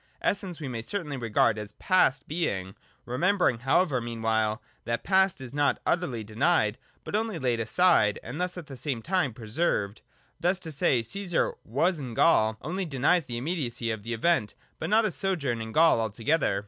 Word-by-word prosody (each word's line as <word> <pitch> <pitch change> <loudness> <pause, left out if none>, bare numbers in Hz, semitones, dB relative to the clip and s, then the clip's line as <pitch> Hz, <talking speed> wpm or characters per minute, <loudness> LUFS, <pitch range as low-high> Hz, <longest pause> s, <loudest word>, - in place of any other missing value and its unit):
Essence 190 -4 -1
we 150 - -5
may 120 -3 -4
certainly 150 - -3
regard 115 -2 +1
as 105 0 -7
past 145 - +2
Being, 100 - -2 0.3
remembering 160 - +1
however 135 +1 +2
meanwhile 110 -2 -1 0.2
that 115 0 -2
the - - -17
past 190 -2 +3
is 130 -1 -8
not 145 0 +1
utterly 135 -11 0
denied, 110 0 +1 0.2
but - - -4
only 220 -3 -1
laid 125 -5 0
aside 110 - +3
and 135 +9 -5
thus 180 0 -2
at 175 - -7
the 140 - -9
same 125 -2 -3
time 180 -6 +1
preserved. 110 -2 -1 0.4
Thus, 180 +2 +1
to 160 - -6
say, 135 -4 +2
Caesar 180 - -1
was 160 - 0
in 125 -5 -6
Gaul, 110 -9 +4
only 185 +4 -2
denies 150 +3 +2
the 120 -2 -5
immediacy 125 -5 -2
of 110 -2 -4
the 115 +3 -4
event, 120 -4 +1 0.2
but - - -3
not 220 +2 +4
his 205 - -1
sojourn 140 -12 -1
in 110 0 -6
Gaul 160 -3 +5
altogether. 110 0 0
135 Hz, 180 wpm, -27 LUFS, 115-175 Hz, 0.4 s, Gaul